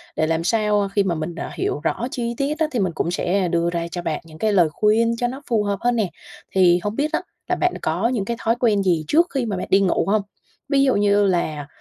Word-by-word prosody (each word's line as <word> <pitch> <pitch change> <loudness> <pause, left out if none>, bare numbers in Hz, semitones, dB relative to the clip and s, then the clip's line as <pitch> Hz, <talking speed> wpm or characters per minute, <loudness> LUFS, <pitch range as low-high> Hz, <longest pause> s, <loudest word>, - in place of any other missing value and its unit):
để 155 - +1
làm 165 0 0
sao, 210 +1 +2
ơ, 200 - 0
khi 200 - +4
mà 175 -3 -1
mình, 155 +2 -4
ờ, 165 - -5
hiểu - - -2
rõ 240 - -1
chi 235 -1 -2
tiết 295 +3 -1
á 320 - +3
thì 245 - -1
mình 185 -4 0
cũng 170 - -1
sẽ 180 +1 0
đưa 170 0 +1
ra 170 -1 -2
cho 175 - -4
bạn 160 -3 -3
những 155 -1 -13
cái 215 +2 +1
lời 175 -5 +4
khuyên 225 +5 +2
cho 245 +1 0
nó 265 +3 -6
phù 220 -3 +2
hợp 200 -2 -2
hơn 245 0 +2
nè. 215 -6 0 0.4
Thì 180 -2 +4
hông 205 +1 -2
biết 295 +4 0
á, - - +1 0.3
là - - +2
bạn 360 0 +1
có 175 +8 0
những 235 -5 -1
cái 235 +2 -3
thói 230 +1 +1
quen 210 -5 +2
gì 170 -5 +1
trước 335 - +4
khi 270 -3 0
mà 205 -4 -2
bạn - - -4
đi 195 - +5
ngủ 190 - +1
hông? 210 +1 +2 0.5
Ví 275 -1 +3
dụ 265 -2 +3
như 205 0 +3
là 155 -6 -1
200 Hz, 275 wpm, -22 LUFS, 175-235 Hz, 0.5 s, đi